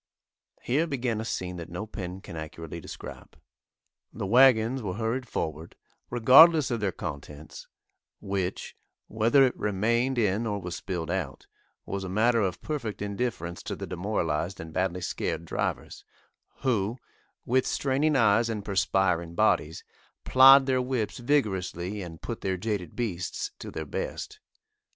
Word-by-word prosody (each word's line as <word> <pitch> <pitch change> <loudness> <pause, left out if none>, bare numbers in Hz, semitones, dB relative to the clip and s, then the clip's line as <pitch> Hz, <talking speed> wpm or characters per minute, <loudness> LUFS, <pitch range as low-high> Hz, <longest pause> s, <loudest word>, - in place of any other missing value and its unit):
Here 150 +7 +1
began 125 -6 -2
a - - -5
scene 90 -4 -4
that 85 -1 -7
no 90 +5 -5
pen 95 -3 -7
can 95 -4 -10
accurately 80 +1 -7
describe. - - -10 0.7
The 105 - -5
wagons 125 +2 +5
were 95 -5 -4
hurried 115 +3 -2
forward, 80 -4 -4 0.3
regardless 135 +5 +7
of 120 - 0
their 100 -2 0
contents, 75 -2 -8 0.5
which, 95 -2 -3 0.3
whether 115 +5 +4
it 130 - +2
remained 115 +6 0
in 110 0 +1
or 100 -1 -2
was 90 -2 -5
spilled 90 -2 -4
out, 85 -8 -4 0.4
was 100 0 -4
a 95 - -5
matter 115 +5 +3
of 95 -3 -2
perfect 130 -9 -4
indifference 100 -4 -3
to - - -5
the - - -6
demoralised 90 -2 -2
and 80 -1 -8
badly 90 0 -1
scared - - -3
drivers, - - -3 0.6
who, 115 -3 0 0.5
with 130 +2 +2
straining 145 +3 +1
eyes 115 -1 +4
and 105 -3 -4
perspiring 95 -3 +1
bodies, 80 -1 +1 0.4
plied 135 +1 +8
their 130 -1 +1
whips 125 -4 -2
vigorously 105 -7 -1
and 85 -3 -9
put 115 - -5
their 95 -1 -1
jaded 95 -4 -3
beasts 95 -7 -3
to - - -7
their 80 - -5
best. - - -5
105 Hz, 145 wpm, -27 LUFS, 90-120 Hz, 0.7 s, plied